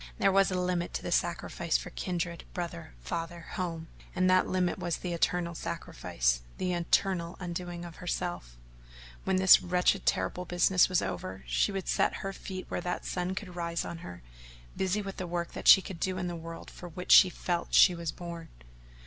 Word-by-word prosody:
There -, -, +3 dB
was 195 Hz, 0 st, +4 dB
a 185 Hz, -1 st, -1 dB
limit 180 Hz, -1 st, -1 dB
to -, -, -3 dB
the -, -, -4 dB
sacrifice 170 Hz, -1 st, 0 dB
for -, -, -8 dB
kindred, 170 Hz, -2 st, -3 dB
brother, 165 Hz, -, -5 dB
father, 165 Hz, -, -4 dB
home, 165 Hz, -3 st, -3 dB, 0.3 s
and 185 Hz, 0 st, +2 dB
that 185 Hz, 0 st, +4 dB
limit 185 Hz, 0 st, 0 dB
was 175 Hz, -2 st, -1 dB
the 180 Hz, -1 st, -4 dB
eternal 170 Hz, 0 st, 0 dB
sacrifice -, -, -2 dB, 0.2 s
the 180 Hz, -1 st, -1 dB
eternal 175 Hz, 0 st, 0 dB
undoing 175 Hz, -1 st, -5 dB
of 170 Hz, -1 st, -10 dB
herself: 175 Hz, -, -4 dB, 0.7 s
when 190 Hz, -, +1 dB
this 185 Hz, 0 st, +7 dB
wretched 180 Hz, +2 st, +1 dB
terrible 180 Hz, -, 0 dB
business 180 Hz, +1 st, +3 dB
was 185 Hz, -, +2 dB
over 95 Hz, 0 st, -5 dB
she -, -, +1 dB
would 195 Hz, -2 st, -4 dB
set -, -, +2 dB
her 195 Hz, -, -3 dB
feet 185 Hz, -1 st, -7 dB
where -, -, -3 dB
that 180 Hz, 0 st, -3 dB
sun 180 Hz, +1 st, -2 dB
could 185 Hz, -3 st, -6 dB
rise 170 Hz, -1 st, -2 dB
on 170 Hz, -, -6 dB
her, 90 Hz, -, -10 dB, 0.5 s
busy 190 Hz, +2 st, 0 dB
with 195 Hz, -1 st, -7 dB
the 185 Hz, -, -4 dB
work 170 Hz, 0 st, -3 dB
that -, -, -6 dB
she 195 Hz, -, +9 dB
could 180 Hz, -3 st, -7 dB
do 185 Hz, +1 st, -1 dB
in 185 Hz, -, -2 dB
that 175 Hz, -1 st, -3 dB
world 165 Hz, 0 st, -9 dB
for 175 Hz, -, -9 dB
which 180 Hz, +2 st, -5 dB
she 185 Hz, -, +9 dB
felt 175 Hz, -1 st, -3 dB
she 180 Hz, -, +8 dB
was 170 Hz, -2 st, -3 dB
born. 170 Hz, -2 st, -8 dB
175 Hz, 190 wpm, -30 LUFS, 170-185 Hz, 0.7 s, she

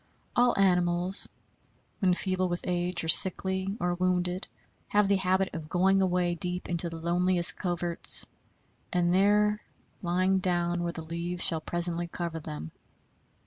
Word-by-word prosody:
All 245 Hz, 0 st, +3 dB
animals, 180 Hz, -1 st, +1 dB, 0.7 s
when 185 Hz, -3 st, +2 dB
feeble 185 Hz, -1 st, -1 dB
with 175 Hz, 0 st, -2 dB
age, 175 Hz, 0 st, -1 dB
or -, -, -4 dB
sickly, 190 Hz, +3 st, +2 dB
or 175 Hz, 0 st, 0 dB
wounded, 180 Hz, +1 st, -1 dB, 0.4 s
have 205 Hz, -1 st, +2 dB
the 200 Hz, 0 st, +3 dB
habit 190 Hz, 0 st, 0 dB
of 160 Hz, -2 st, -7 dB
going 190 Hz, +2 st, +2 dB
away 180 Hz, -2 st, +1 dB
deep 180 Hz, +1 st, -2 dB
into 170 Hz, 0 st, -2 dB
the 165 Hz, -, -7 dB
loneliest 175 Hz, +1 st, 0 dB
coverts, 175 Hz, -1 st, +3 dB, 0.7 s
and 175 Hz, -1 st, +1 dB
there 210 Hz, +2 st, +3 dB, 0.4 s
lying 185 Hz, +2 st, +1 dB
down 175 Hz, -1 st, 0 dB
where 170 Hz, 0 st, -2 dB
the 165 Hz, -, -6 dB
leaves 170 Hz, +2 st, -4 dB
shall 160 Hz, -2 st, +2 dB
presently 175 Hz, +1 st, -1 dB
cover 170 Hz, -1 st, -5 dB
them. 80 Hz, -, -7 dB
180 Hz, 145 wpm, -28 LUFS, 175-190 Hz, 0.7 s, All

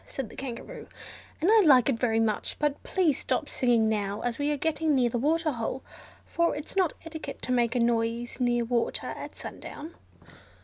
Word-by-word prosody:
said 265 Hz, -6 st, -5 dB
the -, -, -12 dB
Kangaroo, 270 Hz, -, -7 dB, 0.5 s
"and 355 Hz, +6 st, +3 dB
I 445 Hz, -, +7 dB
like 260 Hz, -7 st, +6 dB
it 255 Hz, -5 st, +1 dB
very 225 Hz, -2 st, +2 dB
much, 220 Hz, -2 st, 0 dB
but 295 Hz, -1 st, -1 dB
please 345 Hz, -7 st, +1 dB
stop -, -, -1 dB
singing 235 Hz, -3 st, +2 dB
now, 205 Hz, -2 st, -1 dB
as 245 Hz, +1 st, -2 dB
we 290 Hz, +1 st, +1 dB
are 295 Hz, -, 0 dB
getting 320 Hz, 0 st, +1 dB
near 245 Hz, -3 st, +2 dB
the 240 Hz, -, -1 dB
waterhole, 290 Hz, -4 st, -1 dB, 0.4 s
for 340 Hz, 0 st, +1 dB
it's 295 Hz, +5 st, -7 dB
not 370 Hz, -4 st, +2 dB
etiquette 320 Hz, -1 st, -7 dB
to -, -, -2 dB
make 240 Hz, -1 st, +2 dB
a -, -, +2 dB
noise 235 Hz, +1 st, 0 dB
near 240 Hz, -1 st, +1 dB
water 235 Hz, 0 st, -1 dB
at -, -, -9 dB
sundown." 315 Hz, +3 st, -8 dB
255 Hz, 185 wpm, -28 LUFS, 235-305 Hz, 0.5 s, I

